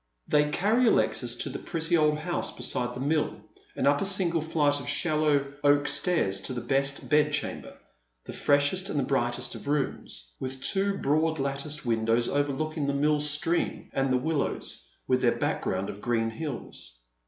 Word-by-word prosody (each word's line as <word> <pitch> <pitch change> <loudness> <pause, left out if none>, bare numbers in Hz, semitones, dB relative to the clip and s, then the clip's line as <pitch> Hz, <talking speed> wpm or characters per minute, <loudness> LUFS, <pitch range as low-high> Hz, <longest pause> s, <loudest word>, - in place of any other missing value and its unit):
Thev 150 0 +3
carry 225 +9 +2
Alexis - - +1
to - - -3
the - - -5
pretty 165 0 -1
old 150 -2 +3
house 175 +3 -2
beside 125 -1 -2
the - - -6
mill, 150 +3 0 0.4
and - - -1
Tir> 145 0 +5
a - - -1
single 185 -4 +2
flight 150 -2 +1
of 140 - -5
shallow 150 -2 +1
oak 145 0 +4
stairs 100 - 0
to 130 - -6
the 120 - -3
best 135 +1 -1
bedchamber, 150 -1 0 0.5
tlie - - -7
freshest 145 +7 +1
and 140 -3 -1
biightest 120 -2 -1
of - - -9
rooms, - - -3
with 130 0 -6
two 195 0 +1
broad 160 +3 +1
latticed 140 +2 -3
■>.\ - - -17
indows 115 +1 +1
overlooking 145 +1 -1
the 140 - +1
mill 150 +1 +2
stream 150 +3 0
and 135 0 +1
tlie 125 -1 +1
willows, 145 - -2 0.2
with - - +2
their - - +2
background 95 - -1
of 100 - -7
green 115 -1 0
hills. 115 - -7
145 Hz, 170 wpm, -28 LUFS, 130-155 Hz, 0.5 s, Tir>